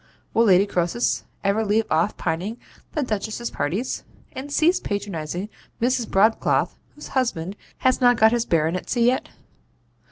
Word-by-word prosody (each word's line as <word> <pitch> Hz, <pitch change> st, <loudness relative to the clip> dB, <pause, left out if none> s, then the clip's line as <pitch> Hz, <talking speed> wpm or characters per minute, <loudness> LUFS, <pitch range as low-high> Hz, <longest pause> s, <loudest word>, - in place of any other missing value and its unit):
Will 230 Hz, -, +4 dB
Lady 195 Hz, -1 st, +6 dB
Croesus 180 Hz, +4 st, 0 dB, 0.2 s
ever 200 Hz, +3 st, +2 dB
leave 215 Hz, +1 st, +2 dB
off 165 Hz, +6 st, +1 dB
pining 180 Hz, +7 st, -2 dB, 0.4 s
the 300 Hz, -, 0 dB
Duchess's 220 Hz, +1 st, -3 dB
parties, 185 Hz, -, -2 dB, 0.3 s
and 275 Hz, +2 st, -7 dB
cease 330 Hz, +5 st, +3 dB
patronizing 190 Hz, -2 st, -4 dB, 0.3 s
Mrs. 245 Hz, -1 st, +1 dB
Broadcloth 215 Hz, +4 st, +2 dB, 0.2 s
whose 295 Hz, -, -10 dB
husband 200 Hz, -8 st, -1 dB, 0.2 s
has 255 Hz, 0 st, +2 dB
not 245 Hz, -1 st, +5 dB
got 220 Hz, 0 st, +6 dB
his 240 Hz, -1 st, +1 dB
Baronetcy 170 Hz, +9 st, +1 dB
yet? 250 Hz, +2 st, +2 dB
215 Hz, 135 wpm, -23 LUFS, 185-245 Hz, 0.4 s, Lady